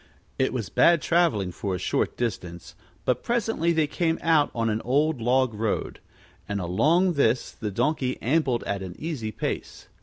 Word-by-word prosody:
It 130 - +2
was 115 -8 -3
bad 170 - +5
traveling 145 - +1
for 95 +1 -3
a - - -2
short - - -1
distance, 90 -7 -4 0.3
but 125 - +1
presently 225 -8 0
they 160 -2 +2
came 165 +2 0
out 160 -3 +4
on 115 -1 0
an 110 0 0
old 145 +2 +1
log 125 +1 +2
road; 110 0 -2 0.5
and 100 0 -1
along 155 - +2
this 125 -5 +1
the 105 - -5
Donkey 130 +4 -1
ambled 130 -2 +1
at 100 -1 -3
an 90 -2 -7
easy 145 -9 -4
pace. - - -5
125 Hz, 170 wpm, -25 LUFS, 110-160 Hz, 0.5 s, bad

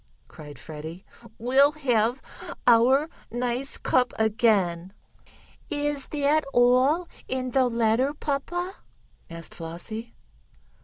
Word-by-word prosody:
cried 145 -2 -12
Freddie. 160 +6 -9 0.3
"We'll 270 +5 +4
have 245 -4 0 0.4
our 250 +5 +5 0.2
nice 245 +3 -2
cup 250 -1 +1
again!" 205 -5 +1 0.8
"Is 290 -1 -1
that 300 +1 +1
all 255 +8 +4 0.2
in 255 -1 -3
the 260 0 +3
letter, 235 +3 +1
papa?" 350 +7 -3 0.5
asked 165 -1 -9
Flossie. 180 +8 -7
245 Hz, 95 wpm, -26 LUFS, 215-275 Hz, 0.8 s, our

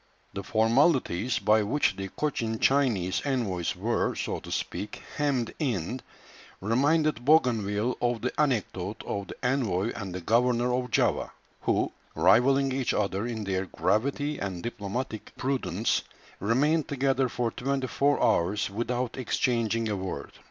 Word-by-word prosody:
The - - -4
formalities 120 - +2
by 110 +1 +3
which 110 +9 +1
the 95 0 -4
Cochin 115 -4 -2
Chinese 115 -10 +2
envoys 110 - -1
were, - - 0
so - - -3
to - - -10
speak, 105 - -4 0.2
hemmed 140 -6 0
in, 120 - -2 0.6
reminded 145 - +2
Bougainville 120 -6 +2
of 120 -2 0
the 125 - -1
anecdote 105 -8 -1
of 100 -1 -3
the - - -8
envoy 115 -6 +1
and 95 -4 -5
the - - -3
governor 120 +4 +2
of 125 0 -1
Java, - - +1 0.3
who, - - +1 0.2
rivalling 135 +3 +4
each 130 -3 0
other 100 +1 0
in 115 -3 -4
their 95 -1 -1
gravity 140 - 0
and 95 -3 -4
diplomatic 115 0 -4
prudence, 135 0 0 0.4
remained 145 - +2
together 135 -1 +1
for 120 -1 -1
twenty 135 +2 -1
four 140 +3 +1
hours 100 +4 +2
without 120 +4 -2
exchanging 115 -3 0
a 105 - -1
word. 95 -1 -5
120 Hz, 140 wpm, -28 LUFS, 105-135 Hz, 0.6 s, rivalling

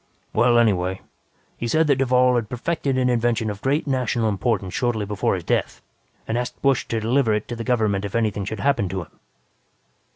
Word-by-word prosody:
"Well, 120 0 +4
anyway, 95 -5 +2 0.6
he 120 - -3
said 155 +7 +3
that 140 -3 +3
Duvall 125 -1 +3
had 115 -4 -1
perfected 135 +1 -2
an 130 -1 +2
invention 115 -2 +1
of 100 0 -9
great 140 +4 0
national 125 -5 0
importance 100 -2 -1
shortly 120 -4 0
before 105 -1 0
his - - -5
death - - -1 0.5
and 115 +2 0
asked 125 0 -5
Busch 135 -3 +2
to 115 - -1
deliver 115 0 +2
it 105 - -3
to 120 - -3
the 115 - -5
government 110 -5 +1
if 100 +1 -5
anything 110 -3 0
should 105 +1 -5
happen 130 -9 +1
to 95 -1 -3
him. - - -22
120 Hz, 195 wpm, -23 LUFS, 105-125 Hz, 0.6 s, Well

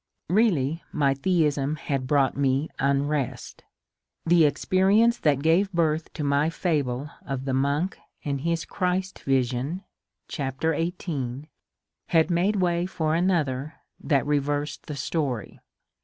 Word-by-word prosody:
Beally 165 - +2
my 140 -3 +2
theism 150 -2 +1
had 140 -4 -3
brought 140 -1 +2
me 140 +2 +1
unrest. 140 -2 -1 0.6
The 165 -1 +5
experience 200 +9 +3
that 145 -3 +2
gave 175 +5 +3
birth 160 -3 0
to 150 - -4
my 145 +2 +2
fable 145 -5 -1
of 135 -1 -4
the 135 - -1
monk 140 +7 0 0.3
and 140 -2 -2
his 170 +1 -1
Christ 185 +1 -2
vision 135 +6 -1 0.4
(chapter 140 +2 -2
xviii) 150 -5 -3 0.6
had 165 +1 +3
made 180 +5 +2
way 175 -2 +1
for 155 -4 -1
another 155 -5 0 0.2
that 140 -2 +1
reversed 145 0 -1
the 150 - -4
story. 140 -5 -3
150 Hz, 125 wpm, -25 LUFS, 140-170 Hz, 0.6 s, The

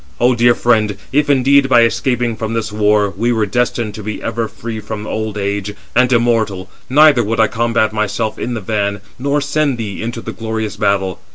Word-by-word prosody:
O 125 +1 +4
dear 120 0 +4
friend, 110 -4 +1
if 145 +1 +1
indeed, 140 0 +4
by 120 -2 +6
escaping 120 0 0
from 110 +1 -4
this 110 -2 -2
war, 105 -1 +2
we 115 +5 0
were 110 -3 +1
destined 120 0 -1
to 105 - -8
be 105 +1 -5
ever 115 0 -2
free 115 0 -7
from 105 0 -6
old 110 -1 -3
age, 100 0 -3 0.2
and 125 0 +4
immortal, 110 -6 +1 0.2
neither 145 -2 +5
would 115 +2 -2
I 110 - +6
combat 115 -1 0
myself 110 +1 -2
in 120 - -3
the 110 - -4
van, 100 -1 -2 0.2
nor 140 +2 0
send 145 -2 0
thee 105 -4 -5
into 115 +1 -4
the 115 - -6
glorious 110 -2 -4
battle. 95 -2 0
115 Hz, 195 wpm, -16 LUFS, 105-120 Hz, 0.2 s, by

